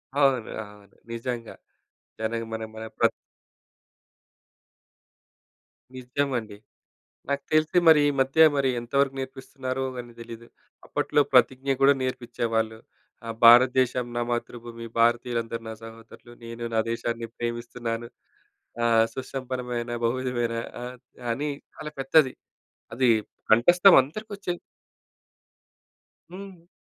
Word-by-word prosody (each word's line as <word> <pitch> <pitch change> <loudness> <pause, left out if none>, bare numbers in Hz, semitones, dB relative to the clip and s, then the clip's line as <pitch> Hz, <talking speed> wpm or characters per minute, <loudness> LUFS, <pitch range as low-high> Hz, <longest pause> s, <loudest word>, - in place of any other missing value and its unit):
అవునండి. 135 -5 +2
అవును 105 -1 -16 0.2
నిజంగా. 115 0 -5 0.6
దానికి 115 +1 -2
మన 110 0 -4
మన 110 - -7
ప్ర - - +3 2.9
నిజమండి. 125 -4 -3 0.7
నాకు 140 0 -1
తెలిసి 155 +3 +3
మరి 160 -2 +8
ఈ - - +3
మధ్య 135 +5 +5
మరి 135 -1 +2
ఎంత 120 0 -12
వరకు 135 -1 +1
నేర్పిస్తున్నారో 130 0 -5
కాని 120 -1 -7
తెలీదు. 115 0 -10 0.4
అప్పట్లో - - +1
ప్రతిజ్ఞ 130 +1 +3
కూడా 135 +1 +7
నేర్పిచ్ఛేవాళ్ళు. 115 -3 -2 0.5
ఆ! - - -5 0.2
"భారతదేశం 125 +1 +6
నా - - 0
మాతృభూమి 120 -1 -5
భారతీయులందరూ 115 -1 +1
నా 110 - -5
సహోదరులు 115 +1 -13
నేను 115 0 -7
నా 110 - +3
దేశాన్ని 115 0 -3
ప్రేమిస్తున్నాను 120 0 -4 0.8
ఆహ్, 115 -1 +5
సుసంపన్నమైన 125 -2 -4
బహువిధమైన", 120 -1 -1 0.3
ఆహ్, 125 +1 -7 0.4
అని 145 +5 -2 0.3
చాలా 150 -1 -7
పెద్దది. 135 0 +4 0.6
అది 125 0 +3 0.4
కంఠస్థం 175 - +6
అందరికి 185 +12 -8
వచ్ఛేది. 175 -3 -4 1.7
హ్మ్. 185 -2 -11
125 Hz, 105 wpm, -26 LUFS, 115-135 Hz, 2.9 s, మరి